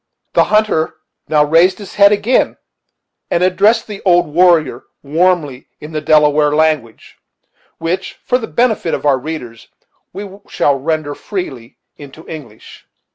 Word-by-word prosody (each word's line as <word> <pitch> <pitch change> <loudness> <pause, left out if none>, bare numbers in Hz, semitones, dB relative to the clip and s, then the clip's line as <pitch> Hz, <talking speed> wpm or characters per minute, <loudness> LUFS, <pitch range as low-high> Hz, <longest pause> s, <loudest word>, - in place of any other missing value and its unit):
The - - +4
hunter 210 -8 +1 0.3
now 150 -1 +4
raised 170 +5 +3
his 200 -3 -11
head 200 0 +5
again, 210 +5 +1 0.7
and 170 - +1
addressed 205 +5 +2
the 205 -2 -9
old 175 -2 +3
warrior 165 -5 +2 0.2
warmly 155 -3 0
in 150 - -10
the 155 -1 -3
Delaware 150 -1 +3
language, 155 -8 -1 0.6
which, 175 +3 -3
for 250 - +1
the 225 - -6
benefit 225 -8 0
of - - -7
our 135 -3 +3
readers, 125 -6 -8 0.4
we 195 +1 -9
shall 145 - +1
render 155 0 -2
freely 140 - -7 0.2
into 145 +2 -13
English. 130 -9 -11
160 Hz, 135 wpm, -15 LUFS, 150-190 Hz, 0.7 s, head